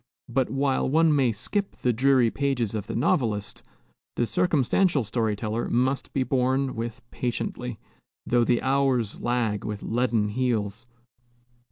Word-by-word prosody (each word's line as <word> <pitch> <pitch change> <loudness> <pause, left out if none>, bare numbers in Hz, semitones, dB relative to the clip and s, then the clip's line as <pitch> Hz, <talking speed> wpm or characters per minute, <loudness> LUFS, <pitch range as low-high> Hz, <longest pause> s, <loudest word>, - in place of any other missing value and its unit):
But 125 +1 0
while 135 -1 0
one 160 +1 +4
may 130 -4 +3
skip 195 - -2
the 125 - 0
dreary 130 -1 +3
pages 135 -6 -1
of 105 -2 -4
the - - -4
novelist, 115 - 0 0.5
the 120 - +1
circumstantial 155 +1 +2
story 110 0 -1
teller 110 +2 -3
must 130 +3 0
be 135 - 0
borne 130 +1 +1
with 115 +2 -5
patiently, 125 -1 -3 0.5
though 120 -1 +3
the 120 0 +1
hours 130 -5 +1
lag 120 -4 0
with 105 -1 -5
leaden 115 -3 +1
heels. 115 -2 -1
125 Hz, 140 wpm, -26 LUFS, 115-135 Hz, 0.5 s, one